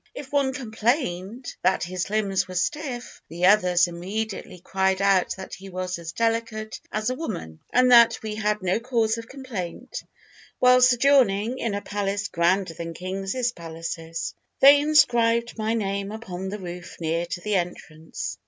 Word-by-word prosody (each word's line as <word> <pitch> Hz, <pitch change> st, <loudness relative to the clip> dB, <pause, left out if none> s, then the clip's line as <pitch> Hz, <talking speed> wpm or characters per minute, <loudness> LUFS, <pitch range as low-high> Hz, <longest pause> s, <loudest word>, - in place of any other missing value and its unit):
If 280 Hz, -2 st, -8 dB
one 280 Hz, -2 st, +2 dB
complained 235 Hz, -, -2 dB
that -, -, +2 dB
his 180 Hz, +1 st, -3 dB
limbs 200 Hz, -2 st, 0 dB
were 185 Hz, -, -8 dB
stiff, 250 Hz, -, -3 dB
the 170 Hz, +2 st, -1 dB
others 180 Hz, -3 st, +5 dB
immediately 190 Hz, +3 st, -5 dB
cried 190 Hz, +1 st, 0 dB
out 195 Hz, -2 st, +3 dB
that 190 Hz, -, -9 dB
he 195 Hz, +1 st, -9 dB
was 185 Hz, -1 st, -4 dB
as 165 Hz, -1 st, -6 dB
delicate 225 Hz, 0 st, -2 dB
as 215 Hz, +3 st, -1 dB
a -, -, 0 dB
woman, 180 Hz, -, -6 dB
and 250 Hz, 0 st, +4 dB
that 235 Hz, -1 st, +7 dB
we 215 Hz, -1 st, -3 dB
had 210 Hz, -1 st, -1 dB
no 185 Hz, +3 st, +1 dB
cause 230 Hz, -2 st, 0 dB
of 230 Hz, -, -10 dB
complaint 250 Hz, -4 st, -6 dB, 0.6 s
while 250 Hz, 0 st, +5 dB
sojourning 250 Hz, -3 st, +4 dB
in 225 Hz, -3 st, -1 dB
a 205 Hz, -, -4 dB
palace 200 Hz, 0 st, -2 dB
grander 175 Hz, +1 st, +1 dB
than 165 Hz, 0 st, -6 dB
kings' 195 Hz, +7 st, -2 dB
palaces. 165 Hz, -2 st, -6 dB, 0.3 s
They 280 Hz, +1 st, +8 dB
inscribed 235 Hz, -6 st, +3 dB
my 220 Hz, +1 st, 0 dB
name 200 Hz, -2 st, -2 dB
upon 190 Hz, -4 st, -6 dB
the 205 Hz, -, -4 dB
roof 180 Hz, -2 st, -8 dB
near 165 Hz, +1 st, -1 dB
to 180 Hz, 0 st, -5 dB
the 210 Hz, +2 st, -2 dB
entrance. 170 Hz, -3 st, -4 dB
205 Hz, 160 wpm, -25 LUFS, 180-235 Hz, 0.6 s, They